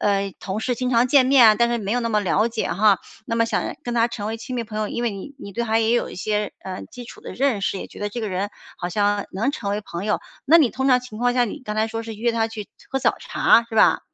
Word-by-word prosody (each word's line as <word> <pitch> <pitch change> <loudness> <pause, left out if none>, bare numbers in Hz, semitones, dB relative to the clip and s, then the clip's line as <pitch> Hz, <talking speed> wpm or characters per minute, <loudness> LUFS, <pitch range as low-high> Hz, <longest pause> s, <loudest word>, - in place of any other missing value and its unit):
呃， 200 -1 +1
同 195 +2 -4
事 245 +2 -1
经 255 +1 -2
常 240 +1 +4
见 270 0 +5
面 260 -3 +7
啊， 215 - +7
但 235 +2 +2
是 240 0 0
没 205 0 -3
有 245 - +1
那 230 - -1
么 215 -2 +2
了 210 +3 +2
解 225 -1 -2
哈， 200 +2 +4 0.3
那 230 -2 -2
么 230 0 +3
想 - - 0 0.2
跟 240 0 -3
他 230 0 +3
成 210 -3 -5
为 225 +1 -3
亲 250 +2 -6
密 235 - -2
朋 215 0 -8
友， 210 - -1
因 240 - -3
为 225 - 0
你 200 +8 -8
你 200 - -9
对 235 - -2
他 225 -1 +1
也 225 0 +2
有 240 - +1
一 - - -9
些， 210 +1 -1
呃， 185 -1 -5
基 245 -1 -9
础 - - -12
的 - - -8
认 260 -6 +1
识， 195 0 -1
也 - - -6
觉 - - -13
得 205 - -1
这 235 +3 -5
个 215 - -2
人 195 +2 -2 0.3
好 175 - -4
像 205 +2 +1
能 225 +9 0
成 200 -8 -4
为 205 +1 -1
朋 175 -1 -6
友， 210 - +1 0.3
那 330 +4 +7
你 280 -7 +5
通 265 +3 -1
常 250 -1 +6
情 245 -4 -10
况 245 +1 +1
下， 245 -1 +3
你 235 - -6
刚 210 0 -4
才 220 +1 +2
说 225 0 -4
是 225 0 -7
约 235 +2 0
他 225 -1 0
去 215 -2 -7 0.2
喝 270 - 0
早 - - +2
茶， 235 - +4
是 225 - -6
吧？ - - +5
225 Hz, 325 characters per minute, -22 LUFS, 205-240 Hz, 0.3 s, 面